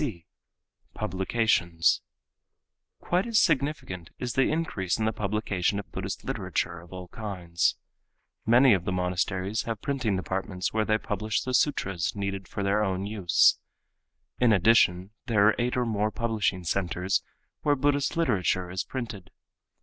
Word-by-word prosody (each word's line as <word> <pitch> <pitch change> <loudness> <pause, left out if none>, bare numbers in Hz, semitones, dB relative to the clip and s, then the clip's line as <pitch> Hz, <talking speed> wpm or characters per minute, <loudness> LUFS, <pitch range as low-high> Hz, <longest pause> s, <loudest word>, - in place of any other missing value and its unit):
(c) 105 - -4 0.7
Publications.—Quite 110 - -1
as 230 -2 +1
significant 140 - 0
is 125 -2 -3
the 135 - +3
increase 130 - -1
in 110 - -1
the 110 - +1
publication 100 -2 -1
of 100 - -7
Buddhist - - -5
literature 85 0 -2
of 85 +1 -15
all 90 -1 -8
kinds. 90 -6 -1 0.7
Many 120 +2 +6
of 95 -2 0
the - - -1
monasteries 90 +3 -1
have 115 -2 -3
printing 130 -8 0
departments 95 0 -3
where 110 0 +1
they 110 0 +2
publish 105 -1 -2
the 130 - -3
sutras 100 - +1
needed 100 -1 -3
for 100 - -4
their 100 +2 +2
own 95 -1 -1
use. 100 -5 +3 0.8
In 125 -2 +4
addition, 95 -2 +4 0.2
there 105 -4 +4
are 110 - +5
eight 125 +1 0
or 125 - +1
more 105 -2 0
publishing 105 -5 -1
centers 90 +2 0 0.4
where 145 -1 +3
Buddhist 145 +2 +1
literature 95 - +1
is 95 +1 -2
printed. 110 -8 -6
100 Hz, 140 wpm, -27 LUFS, 90-115 Hz, 0.8 s, Many